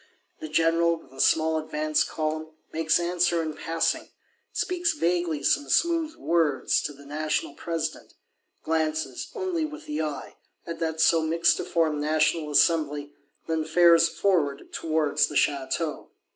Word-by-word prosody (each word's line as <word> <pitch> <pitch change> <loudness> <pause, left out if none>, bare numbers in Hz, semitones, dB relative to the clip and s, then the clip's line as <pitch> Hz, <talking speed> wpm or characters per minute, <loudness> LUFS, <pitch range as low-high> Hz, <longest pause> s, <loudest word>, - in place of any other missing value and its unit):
The 155 - -7
General, 165 +2 +2
with 135 -5 -19
a 135 - -3
small 160 0 +3
advance 155 0 0
column, 155 0 -4 0.2
makes 160 +1 +2
answer 175 -1 +1
in 155 -1 -4
passing; 165 +1 -1 0.4
speaks 350 -3 0
vaguely 175 - -1
some 290 - +1
smooth 330 -2 +1
words 165 - +1
to - - -3
the 140 0 -15
National 150 0 -2
President,—glances, 160 -1 -4
only 370 -5 -1
with 310 0 -6
the 150 +1 -3
eye, 150 -2 -5 0.3
at 170 - -6
that 160 -1 -2
so 165 0 +4
mixtiform 160 -1 +1
National 155 +1 +1
Assembly; 145 -2 +2 0.3
then 160 -1 0
fares 170 +1 +5
forward 160 -9 0
towards 155 -2 +1
the 150 - -8
Château. 145 +3 -1
160 Hz, 130 wpm, -26 LUFS, 155-170 Hz, 0.4 s, fares